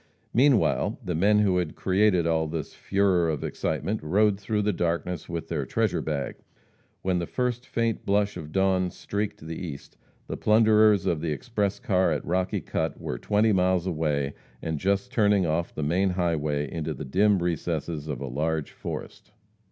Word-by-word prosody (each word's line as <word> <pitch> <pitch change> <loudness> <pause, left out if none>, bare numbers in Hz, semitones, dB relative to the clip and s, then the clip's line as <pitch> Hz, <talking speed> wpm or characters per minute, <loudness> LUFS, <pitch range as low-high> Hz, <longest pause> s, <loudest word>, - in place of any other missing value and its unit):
Meanwhile, 130 -1 +3
the 90 - -1
men 100 +6 +3
who 95 -3 +3
had 85 -4 -2
created 95 -2 +2
all 80 -1 +1
this 80 -1 -5
furore 95 -4 +1
of 75 -3 -2
excitement 105 +3 -2
rode 100 +6 +2
through 105 +1 -1
the 105 0 +1
darkness 85 -1 -2
with 85 -1 -4
their 80 -4 -2
treasure - - 0
bag. 75 -3 -3 0.7
When 95 -1 +1
"the 85 - -3
first 125 -1 -2
faint 115 -2 -1
blush 100 0 +1
of 80 -3 -7
dawn 95 0 +2
streaked 100 -2 -4
the 80 +1 -5
east," 75 -6 -8 0.3
the - - -5
plunderers 110 -2 +4
of 80 -3 0
the 80 -1 -1
express 105 - -2
car 95 -8 +2
at 75 - -2
Rocky 95 +1 0
Cut - - -2
were - - -4
twenty 105 - +2
miles 90 -1 +2
away 75 -5 -1 0.3
and 80 -2 -3
just 100 - 0
turning 105 -5 +3
off 85 +1 -1
the 75 - -2
main 90 +6 +2
highway 75 -5 0
into 80 -2 -3
the 75 - -6
dim 100 +9 +3
recesses 85 -2 -2
of 70 -5 -4
a 70 - -3
large 75 +3 -2
forest. - - -7
90 Hz, 175 wpm, -26 LUFS, 80-100 Hz, 0.7 s, plunderers